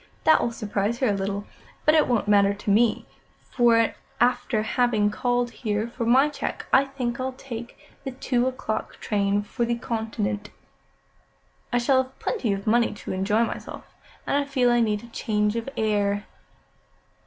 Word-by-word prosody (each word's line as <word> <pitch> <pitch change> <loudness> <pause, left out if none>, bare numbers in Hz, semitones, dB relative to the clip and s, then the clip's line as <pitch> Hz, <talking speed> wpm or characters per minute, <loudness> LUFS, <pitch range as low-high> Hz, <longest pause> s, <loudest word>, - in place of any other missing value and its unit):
That 315 - +5
will 235 - 0
surprise 215 -1 -2
her 255 -2 +1
a - - +2
little, 200 +1 -3 0.4
but 305 - +5
it 310 -2 +4
won't 235 -4 +1
matter 200 -1 +4
to 205 0 -2
me; 225 +2 +3 0.5
for, 230 -2 +4 0.3
after 240 -2 +2
having 220 -3 +1
called 245 +1 0
here 215 -1 -2
for 235 -1 -4
my 265 +5 +5
cheque, 295 - -4
I 270 +1 +6
think 255 -3 -4
I'll 260 0 -2
take 240 -3 -8 0.3
the 270 - -3
two 255 -1 0
o'clock 255 -4 -4
train 205 -1 0
for 210 +3 -3
the 235 0 0
Continent. 220 -3 -3 1.2
I 245 - +2
shall 260 +2 +3
have 260 0 -10
plenty 265 - -1
of 195 0 -3
money 230 0 +2
to - - -6
enjoy 205 +4 +2
myself, - - -5 0.4
and - - 0
I 285 - +2
feel 260 -3 +2
I 240 - +3
need 215 -2 +1
a - - -10
change 210 -2 0
of 230 +3 -3
air." 205 -1 +1
230 Hz, 170 wpm, -25 LUFS, 210-250 Hz, 1.2 s, I